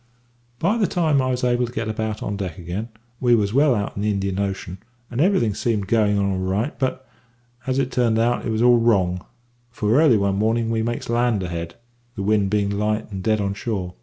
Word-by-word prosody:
"By 205 - +1
the 205 - +3
time 155 -6 +2
I 130 - 0
was 125 0 -2
able 125 0 +2
to - - -9
get 115 -2 -3
about 110 0 -3
on 100 - -3
deck 95 -5 -5
again, 90 +6 -5 0.3
we 120 -2 +4
was 105 -2 0
well 140 -1 +4
out 100 -2 -3
in 100 - -4
the 105 - +1
Indian 100 -1 -1
Ocean, 95 -2 -3 0.3
and 120 +3 -1
everything 155 - +2
seemed 105 -1 -1
going 105 -1 +2
on 100 - +1
all 95 - -2
right; 95 +4 -1
but, 130 -1 -2 0.6
as 130 0 0
it 135 -1 0
turned 120 -3 +2
out, 120 +2 +1
it - - -3
was 110 +1 0
all 120 -1 +6
wrong, 95 -6 +2 0.5
for 115 +3 +2
early 140 -9 +5
one 100 -1 0
morning 115 +2 +1
we 110 -1 0
makes 120 +1 -3
land 120 -4 +1
ahead, 85 -1 -5 0.4
the 100 - -4
wind 105 -1 +2
bein' 100 -1 0
light 105 +1 -1
and 95 -1 -5
dead 110 +1 +1
on 100 -1 -1
shore. 100 -4 -4
110 Hz, 225 wpm, -22 LUFS, 100-120 Hz, 0.6 s, all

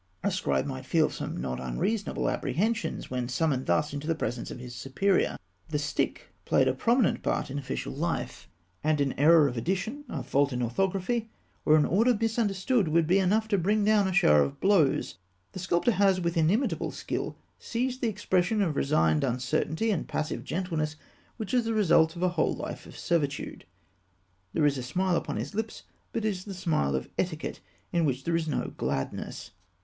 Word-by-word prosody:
A 200 - +1
scribe 185 - 0
might 130 -2 -6
feel 160 0 +3
some - - -5
not 65 0 -3
unreasonable 195 - -1
apprehensions, 210 - -1
when 125 -1 -2
summoned 135 0 0
thus 150 -1 +1
into 145 +1 -5
the 165 - +1
presence 120 -5 -3
of - - -7
his 125 0 -8
superior. 135 +11 +1 0.3
The 150 - 0
stick 150 - -2
played - - +3
a - - +3
prominent 235 -2 +2
part - - -1
in 140 - -2
official 135 -1 -4
life, 165 +5 -3 0.3
and 155 0 +2
an 140 -1 +1
error 155 +1 +6
of 125 -3 -4
addition, 195 - -2
a 135 - -4
fault 140 +2 +2
in 125 0 -1
orthography, 195 - -1 0.4
or 155 - +6
an 150 - +4
order 225 +5 +3
misunderstood, 225 -1 +1
would 165 +1 +3
be 185 +5 +4
enough 210 +4 +2
to 200 -3 +2
bring 205 +4 +2
down 210 -2 +4
a - - -1
shower 75 - +5
of 70 -1 -1
blows. 160 - +2 0.3
The - - -7
sculptor 180 +5 +2
has, 195 -2 +3
with 170 0 -1
inimitable 175 - +1
skill, - - -4 0.2
seized 255 +2 -2
that 240 - +1
expression 205 -1 +1
of 160 -6 -1
resigned 80 - +2
uncertainty 130 - 0
and 190 - -1
passive 155 0 -3
gentleness 160 -3 -2 0.4
which 220 -3 -5
is 245 -2 +3
the 225 0 -1
result 165 -5 +4
of 175 - -4
a 185 - +4
whole 175 -3 +1
life - - -6
of - - -12
servitude. 145 -5 -2 0.9
There 155 - +2
is 140 -2 +2
a - - -3
smile 180 +9 0
upon - - -2
his - - -4
lips, 220 +1 -4 0.3
but 225 - -2
it - - +3
is 185 -3 -4
the 200 -2 -6
smile 155 - 0
of 65 - -2
etiquette, 165 -4 -2 0.3
in 170 -1 +2
which 135 -3 0
there 170 +2 0
is 165 -1 0
no 150 - -2
gladness. 65 - -3
170 Hz, 190 wpm, -28 LUFS, 140-200 Hz, 0.9 s, error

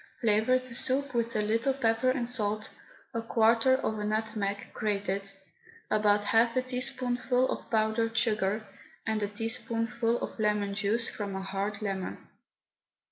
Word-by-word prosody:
Flavour 220 +2 +4
the 255 -1 -8
soup 265 +3 -1
with 235 -1 0
a 210 - +2
little 230 +5 +1
pepper 230 -1 +2
and 255 -2 0
salt, 215 -3 -1 0.4
a 230 - -1
quarter 230 +3 +4
of 220 -5 -2
a - - -2
nutmeg, 210 -2 -2
grated, 200 -2 -1 0.6
about 210 -1 +3
half 230 +3 +3
a 255 - +2
teaspoonful 255 0 0
of - - -5
powdered 225 0 +1
sugar, 215 -1 +1 0.4
and 220 -1 0
a 205 - +1
teaspoonful 230 +2 -1
of - - -6
lemon 210 -2 +1
juice 215 +4 0
from 200 -2 -4
a 190 - -3
hard 200 +2 -3
lemon. 195 -2 -3
225 Hz, 145 wpm, -30 LUFS, 210-245 Hz, 0.6 s, Flavour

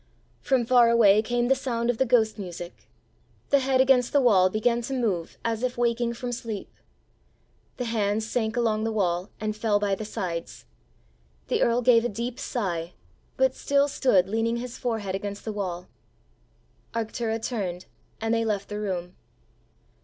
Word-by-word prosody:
From 260 -3 +1
far 240 -1 +5
away 215 -3 +6
came 240 +2 0
the 265 - +5
sound 245 -3 -1
of 230 - -8
the 265 - +2
ghost 220 -3 +2
music. 175 -2 -8 0.6
The 280 - +6
head 265 0 +1
against 260 -2 +4
the 285 - +4
wall 200 -8 +5
began 235 +4 +1
to 265 +3 -4
move 200 -10 -2
as 225 -1 -1
if 250 -1 -2
waking 235 0 0
from 245 +1 -4
sleep. 230 -4 -6 1.0
The 250 - -3
hands 215 -2 0
sank 225 0 -1
along 220 -2 +1
the 225 - -1
wall 180 -3 0
and 215 -1 -2
fell 215 -1 +1
by 205 -1 0
the 195 - -3
sides. 175 -5 -5 0.8
The - - +1
earl 235 +1 +2
gave 230 -2 +5
a 240 - 0
deep 235 +4 -4
sigh, 175 -8 -3 0.4
but 265 0 +3
still 280 +1 +2
stood 250 -10 +2
leaning 225 +3 0
his 245 0 -6
forehead 220 -6 -3
against 200 +1 -5
the 220 - -3
wall. 180 -3 -4 1.1
Arctura 225 0 -2
turned, 190 -7 -4 0.3
and 225 +1 0
they 230 0 +2
left 205 -3 -2
the 210 0 -4
room. 180 -3 -4
225 Hz, 170 wpm, -26 LUFS, 205-245 Hz, 1.1 s, away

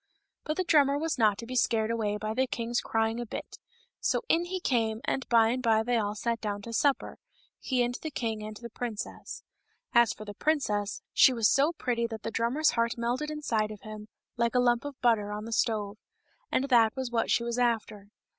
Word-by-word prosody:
But 305 - -2
the 370 - +1
drummer 285 -5 +4
was 315 -2 -2
not 210 -3 +4
to 230 - -7
be 255 +2 -6
scared 225 -2 +2
away 210 -3 -1
by 215 +1 -3
the 260 +3 +1
king's 235 0 -2
crying 225 +1 0
a 240 - -3
bit, - - -7 0.4
so - - 0
in 340 -4 +2
he 370 +1 -3
came, 225 -8 0
and 265 - -2
by 230 -2 +5
and 255 +2 -1
by 220 -2 +3
they 245 +1 0
all 210 -1 -1
sat 230 +1 -2
down 205 -1 -3
to 230 - -7
supper 280 +3 0 0.2
— - - -36
^he 250 -2 +1
and 240 - -3
the 315 - -4
king 225 -6 -3
and 215 0 -7
the 235 0 -9
princess. 230 -3 -6 0.5
As 235 -1 +5
for 215 - -8
the 205 - -7
princess, 210 -7 -1
she 260 - +6
was 230 -3 +3
so 285 +5 +3
pretty 235 -7 -1
that 225 -2 -8
the 225 - -3
drummer's 245 +8 +2
heart 230 0 0
melted 245 +6 -1
inside 235 -9 -1
of 215 -2 -9
him, 215 -1 -9 0.3
like 235 +1 0
a - - +5
lump 240 +1 +2
of 285 -2 -7
butter 220 -4 +2
on 210 +1 -5
the 230 - -5
stove 215 -3 0 0.3
— - - -40
and 275 +2 0
that 230 -3 +4
was 260 -2 -4
what 230 -1 0
she 235 - +2
was 235 +1 -2
after. 220 -4 -1
235 Hz, 225 wpm, -29 LUFS, 220-255 Hz, 0.5 s, she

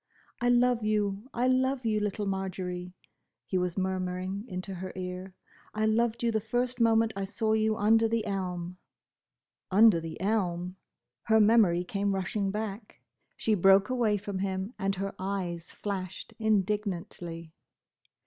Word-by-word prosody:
"I 245 - +3
love 245 -1 +4
you, 210 +1 -1
I 245 +2 0
love 260 0 +1
you, 215 -1 +2
little 210 0 -2
Marjory," 185 -2 -4 0.5
he 185 - 0
was 180 0 -2
murmuring 185 +1 -2
into 185 -1 -5
her 185 0 -6
ear. 185 0 -6 0.4
"I 215 0 +1
loved 230 +2 +1
you 235 - +2
the 220 -1 0
first 245 +4 -1
moment 225 -1 +4
I 195 - -2
saw 220 +2 0
you 220 0 +2
under 225 +2 +4
the 225 -1 0
elm!" 180 -3 -3 0.9
Under 205 -2 +6
the 165 -1 -7
elm! 180 -3 -1 0.5
Her 220 -1 +4
memory 210 -5 +5
came 200 +1 -1
rushing 195 +1 -1
back. 210 - -5 0.4
She 220 - +1
broke 195 +1 +5
away 230 -5 +2
from 200 -1 -5
him 190 +3 -2
and 195 0 0
her 195 +1 -3
eyes 185 -3 -3
flashed 190 -3 -5
indignantly. 190 -6 -1
200 Hz, 145 wpm, -29 LUFS, 185-220 Hz, 0.9 s, Under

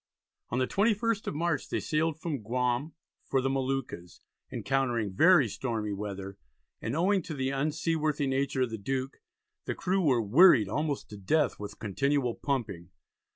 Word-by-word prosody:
On 120 - -2
the 130 - +2
21st 215 - +1
of - - -2
March 170 0 -1
they - - -1
sailed 160 0 -1
from 155 -6 -3
Guam 125 +6 -1 0.3
for 135 - 0
the 135 +1 0
Moluccas, 135 -9 -3 0.3
encountering 120 -7 -1
very 160 - +6
stormy 110 -2 -3
weather, 100 -1 -6 0.4
and 115 +4 -3
owing 190 +4 +2
to 160 - -6
the 130 -1 -1
unseaworthy 155 +1 0
nature 135 0 0
of 125 - -3
the 110 - -5
Duke, 130 +5 -3 0.4
the - - -2
crew 190 +1 0
were 135 -8 +3
"wearied 120 - +6
almost 145 +6 -2
to 105 - -9
death 150 +11 +1
with 105 -1 -7
continual 130 +4 0
pumping." 115 - -3
135 Hz, 155 wpm, -29 LUFS, 115-155 Hz, 0.4 s, very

